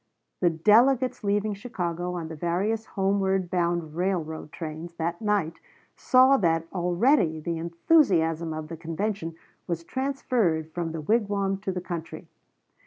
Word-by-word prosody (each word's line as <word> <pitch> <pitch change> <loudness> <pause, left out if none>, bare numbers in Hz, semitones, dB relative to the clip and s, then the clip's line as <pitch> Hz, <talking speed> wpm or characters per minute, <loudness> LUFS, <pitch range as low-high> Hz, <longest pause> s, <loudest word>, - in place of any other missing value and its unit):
The 175 - +4
delegates 240 +9 +3
leaving 205 +1 +1
Chicago 180 -5 -4
on 165 -2 -4
the 160 - -7
various 190 +8 -1
homeward 195 -2 0
bound 170 -3 0
railroad 165 -4 -2
trains 165 +1 -7
that 170 +2 -3
night, 205 -7 0 0.4
saw 260 +1 +5
that 165 -5 +1
already 180 - +2
the 165 +1 -3
enthusiasm 170 - +2
of 155 0 -5
the 165 - -6
convention 165 +1 -3 0.3
was 170 -2 -3
transferred 230 - -1
from 170 -2 -3
the 160 -1 -5
wigwam 200 0 0
to 200 - -2
the 180 -1 -4
country. 170 -2 -6
175 Hz, 135 wpm, -26 LUFS, 165-210 Hz, 0.4 s, saw